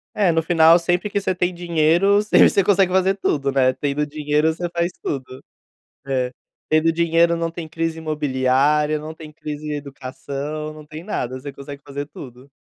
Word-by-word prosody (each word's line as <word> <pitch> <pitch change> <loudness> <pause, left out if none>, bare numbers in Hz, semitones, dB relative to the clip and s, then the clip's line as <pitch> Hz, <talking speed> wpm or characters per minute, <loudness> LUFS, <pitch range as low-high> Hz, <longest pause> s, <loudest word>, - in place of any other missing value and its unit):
É, 195 -5 +3
no 165 0 +2
final, 165 0 +5
sempre 175 +4 0
que 200 0 -1
você 185 -1 -1
tem 180 0 0
dinheiro, 175 +4 +2
sempre 210 - +5
você 200 - +2
consegue 190 -2 +3
fazer 190 +1 +2
tudo, 140 -7 -1
né. 130 -1 +3
Tendo 145 +1 -2
dinheiro, 150 +1 +1
você 175 +2 -4
faz 170 +1 -1
tudo. 130 -2 -5 0.6
É. 130 -2 -1 0.4
Tendo 155 +1 +3
dinheiro 170 0 +2
não 165 0 -1
tem 165 -2 -7
crise 165 0 -3
imobiliária, 150 0 +1
não 155 +1 -7
tem 155 -1 -11
crise 150 -1 -7
em 150 - -2
educação, 140 +2 -6
não 155 -1 -12
tem 155 +2 -9
nada, 130 - -3
você 140 +1 -8
consegue 140 +1 -10
fazer 140 0 -5
tudo. 130 -2 -12
155 Hz, 180 wpm, -21 LUFS, 140-170 Hz, 0.6 s, final